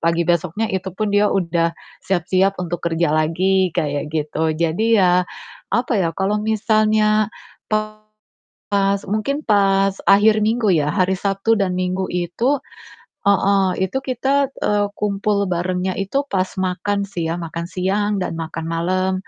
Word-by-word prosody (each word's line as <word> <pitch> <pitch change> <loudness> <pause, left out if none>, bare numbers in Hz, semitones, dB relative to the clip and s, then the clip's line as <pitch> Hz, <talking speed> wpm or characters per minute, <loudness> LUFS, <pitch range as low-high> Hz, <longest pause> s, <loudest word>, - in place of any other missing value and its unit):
pagi 170 +1 +1
besoknya 175 +5 0
itu 190 0 -3
pun 215 -1 -1
dia 205 0 +4
udah 170 -2 0 0.3
siap-siap 190 +2 +1
untuk 175 0 -4
kerja 165 -1 +1
lagi, 185 +3 +1
kayak 145 -3 -1
gitu. 155 +1 -1
Jadi 170 +8 +1
ya, 180 -1 +4 0.5
apa 245 +1 +1
ya, 170 - +1
kalau 195 +2 0
misalnya 215 0 +2 1.2
pas 200 -1 -1
mungkin 275 +8 -1
pas 195 -2 +3 0.2
akhir 210 +2 +5
minggu 225 -1 +1
ya, 150 -2 +1
hari 190 +1 +2
Sabtu 200 +4 +1
dan 185 -2 0
Minggu 185 +1 -1
itu 230 +11 0 0.7
heeh, 200 0 +3 0.2
itu 265 - -3
kita, 270 +2 0
eee, 205 0 +2
kumpul 200 0 0
barengnya 180 +1 -1
itu 270 +9 -1
pas 185 -1 +1
makan 190 +2 -1
sih 170 -4 -3
ya, 165 - -1
makan 170 0 -5
siang, 195 +3 -1
dan 180 - -2
makan 165 0 -5
malam. 185 +3 0
190 Hz, 140 wpm, -20 LUFS, 175-210 Hz, 1.2 s, akhir